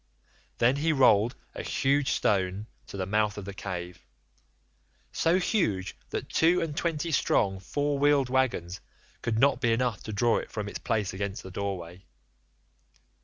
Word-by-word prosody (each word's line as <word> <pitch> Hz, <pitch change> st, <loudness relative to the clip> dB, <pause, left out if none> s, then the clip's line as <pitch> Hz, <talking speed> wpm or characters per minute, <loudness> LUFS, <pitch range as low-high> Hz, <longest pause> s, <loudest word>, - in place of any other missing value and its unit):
Then 125 Hz, +4 st, +3 dB
he 160 Hz, +3 st, +1 dB
rolled 120 Hz, -5 st, +4 dB, 0.2 s
a -, -, -5 dB
huge 140 Hz, +1 st, +1 dB
stone 95 Hz, 0 st, 0 dB, 0.2 s
to -, -, -8 dB
the 95 Hz, -, -2 dB
mouth 105 Hz, +1 st, +1 dB
of 100 Hz, -, -6 dB
the 100 Hz, -, -6 dB
cave—so 90 Hz, -, -5 dB
huge 170 Hz, -, 0 dB
that -, -, -4 dB
two 170 Hz, +3 st, +3 dB
and 155 Hz, -3 st, -3 dB
twenty 165 Hz, 0 st, -1 dB
strong 100 Hz, -8 st, +2 dB
four 145 Hz, +8 st, -1 dB
wheeled 145 Hz, -2 st, +4 dB
waggons 120 Hz, -9 st, 0 dB, 0.4 s
would 110 Hz, -1 st, 0 dB
not 140 Hz, +4 st, +3 dB
be 115 Hz, -, +2 dB
enough 115 Hz, -2 st, 0 dB
to 110 Hz, -, -6 dB
draw 115 Hz, +3 st, +2 dB
it -, -, -8 dB
from 105 Hz, -2 st, -4 dB
its -, -, -6 dB
place 105 Hz, -5 st, -1 dB
against 100 Hz, +1 st, -4 dB
the 95 Hz, -, -9 dB
doorway. 95 Hz, -2 st, -5 dB
110 Hz, 155 wpm, -28 LUFS, 95-140 Hz, 0.4 s, rolled